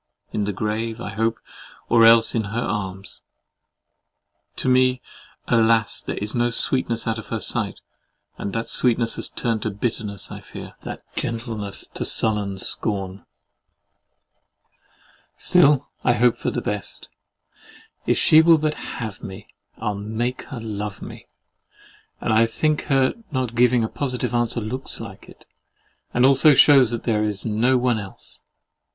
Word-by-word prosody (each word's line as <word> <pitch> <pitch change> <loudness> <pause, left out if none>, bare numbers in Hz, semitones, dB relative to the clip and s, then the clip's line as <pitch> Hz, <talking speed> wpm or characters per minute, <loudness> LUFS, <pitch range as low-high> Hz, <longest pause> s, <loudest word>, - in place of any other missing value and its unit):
In 105 - -1
the 105 - -1
grave, 110 +3 -3
I 120 - -6
hope, 115 +3 -1 0.5
or 115 -1 +5
else 115 0 +6
in 110 -2 -1
her 110 +4 -4
arms. 95 -3 -5 1.3
To - - -3
me, 130 0 +3 0.5
alas! 115 -2 +2
there - - -5
is 105 +1 -4
no 120 0 +1
sweetness 120 0 +4
out 115 0 -1
of 110 - -10
her - - -3
sight, - - 0 0.5
and 100 - -5
that 115 +2 -3
sweetness 115 -2 +1
has - - +2
turned 115 -3 -2
to 110 - -2
bitterness, 105 -1 -4
I - - -7
fear; - - -10
that - - -8
gentleness 115 -4 -5
to - - -4
sullen 105 -3 +1
scorn! 95 -1 -4 2.1
Still 145 -6 +3 0.2
I 125 - +3
hope 120 0 +3
for - - -3
the - - -3
best. 105 -2 -5 1.0
If - - +2
she 155 - +6
will 165 0 +6
but 155 0 -1
HAVE 110 -8 -7
me, 95 +2 -10 0.3
I'll 105 -2 -2
make 110 +5 -4
her 130 -5 -8
LOVE 105 -2 -6
me: - - -11 0.9
and - - -1
I 115 +1 +4
think 155 +6 -1
her 135 -2 +2 0.2
not 130 -4 -2
giving 120 0 +3
a - - 0
positive 125 -2 -3
answer 120 0 0
looks 125 +5 -5
like - - -10
it, - - -17 0.7
and 120 +1 +3
also 140 +2 +5
shews 135 -3 +6
that 120 -1 -4
there 110 -3 0
is 105 -2 -3
no 115 +4 +2
one 125 -2 +1
else. 100 -2 -11
115 Hz, 150 wpm, -22 LUFS, 105-125 Hz, 2.1 s, else